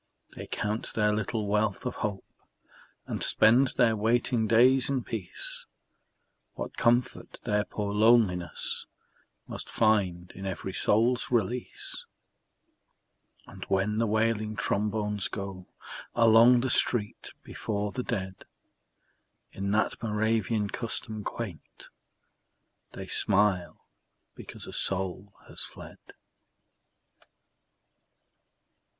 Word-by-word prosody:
They -, -, -8 dB
count 105 Hz, +1 st, -3 dB
their 105 Hz, -2 st, +2 dB
little 110 Hz, +1 st, -2 dB
wealth 105 Hz, +1 st, 0 dB
of 125 Hz, -, -3 dB
hope 100 Hz, -4 st, -3 dB, 0.8 s
And -, -, -4 dB
spend 120 Hz, +5 st, +4 dB
their 115 Hz, -1 st, +4 dB
waiting 115 Hz, +1 st, +1 dB
days 125 Hz, +4 st, +5 dB
in 135 Hz, -3 st, 0 dB
peace, 100 Hz, -7 st, -2 dB, 0.9 s
What -, -, -6 dB
comfort 120 Hz, +2 st, 0 dB
their 105 Hz, -3 st, 0 dB
poor 100 Hz, -1 st, -4 dB
loneliness 105 Hz, -6 st, +2 dB, 0.6 s
Must -, -, -7 dB
find 95 Hz, -6 st, +1 dB
in 95 Hz, +1 st, -7 dB
every 95 Hz, 0 st, -5 dB
soul's 115 Hz, +3 st, +2 dB
release! 120 Hz, +1 st, -2 dB, 1.4 s
And -, -, -10 dB
when 100 Hz, +3 st, 0 dB
the 115 Hz, -, +2 dB
wailing 110 Hz, 0 st, 0 dB
trombones 105 Hz, -1 st, -1 dB
go 95 Hz, -2 st, -7 dB, 0.5 s
Along 115 Hz, +1 st, +6 dB
the 130 Hz, 0 st, -1 dB
street 110 Hz, -4 st, +1 dB
before 105 Hz, -2 st, -3 dB
the 125 Hz, -, -3 dB
dead 95 Hz, -5 st, -4 dB, 1.1 s
In 100 Hz, 0 st, -4 dB
that 105 Hz, +2 st, 0 dB
Moravian 110 Hz, -1 st, 0 dB
custom 110 Hz, -2 st, -3 dB
quaint, 100 Hz, -10 st, -7 dB, 1.0 s
They -, -, -7 dB
smile 95 Hz, -5 st, +1 dB, 0.5 s
because -, -, -10 dB
a -, -, -9 dB
soul 95 Hz, +1 st, -2 dB
has -, -, -5 dB
fled. -, -, -11 dB
105 Hz, 100 wpm, -28 LUFS, 100-115 Hz, 1.4 s, Along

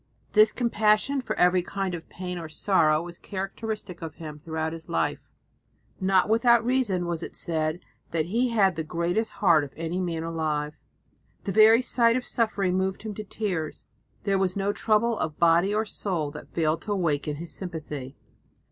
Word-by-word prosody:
This 215 Hz, 0 st, +6 dB
compassion 230 Hz, +3 st, +2 dB
for 250 Hz, -, -3 dB
every 180 Hz, 0 st, +4 dB
kind 190 Hz, +1 st, -3 dB
of 170 Hz, -1 st, -7 dB
pain 180 Hz, -1 st, -5 dB
or 165 Hz, -2 st, -7 dB
sorrow 155 Hz, -2 st, +2 dB
was 175 Hz, 0 st, -9 dB
characteristic 195 Hz, -1 st, -5 dB
of 160 Hz, -2 st, -6 dB
him 155 Hz, -3 st, -8 dB
throughout 160 Hz, 0 st, -3 dB
his 165 Hz, 0 st, -10 dB
life. 80 Hz, 0 st, -1 dB, 0.7 s
Not 190 Hz, 0 st, +3 dB
without 230 Hz, +1 st, +4 dB
reason 235 Hz, -8 st, +1 dB
was 170 Hz, -1 st, -2 dB
it -, -, -7 dB
said 160 Hz, +1 st, -1 dB, 0.3 s
that 160 Hz, -2 st, 0 dB
he 235 Hz, +8 st, +1 dB
had 195 Hz, -6 st, +3 dB
"the 160 Hz, -, -2 dB
greatest 175 Hz, +7 st, -1 dB
heart 170 Hz, -6 st, +4 dB
of 140 Hz, -, -9 dB
any 165 Hz, +2 st, -2 dB
man 170 Hz, -3 st, -2 dB
alive." 155 Hz, -2 st, -2 dB, 0.7 s
The 200 Hz, -, -2 dB
very 220 Hz, +4 st, +6 dB
sight 235 Hz, -1 st, +3 dB
of 255 Hz, -, -4 dB
suffering 200 Hz, -5 st, 0 dB
moved 190 Hz, +1 st, -1 dB
him 215 Hz, -1 st, -4 dB
to 215 Hz, -, -6 dB
tears; 190 Hz, -7 st, -4 dB, 0.4 s
there 195 Hz, -2 st, +1 dB
was 185 Hz, -1 st, 0 dB
no 200 Hz, 0 st, 0 dB
trouble 225 Hz, +2 st, +2 dB
of 155 Hz, -1 st, -2 dB
body 170 Hz, +3 st, +4 dB
or 215 Hz, +1 st, +1 dB
soul 175 Hz, -8 st, -2 dB
that 150 Hz, -, -10 dB
failed 160 Hz, -1 st, 0 dB
to 210 Hz, -, -5 dB
awaken 150 Hz, -5 st, 0 dB
his 165 Hz, +3 st, -7 dB
sympathy. 150 Hz, -7 st, -6 dB
180 Hz, 175 wpm, -26 LUFS, 160-215 Hz, 0.7 s, This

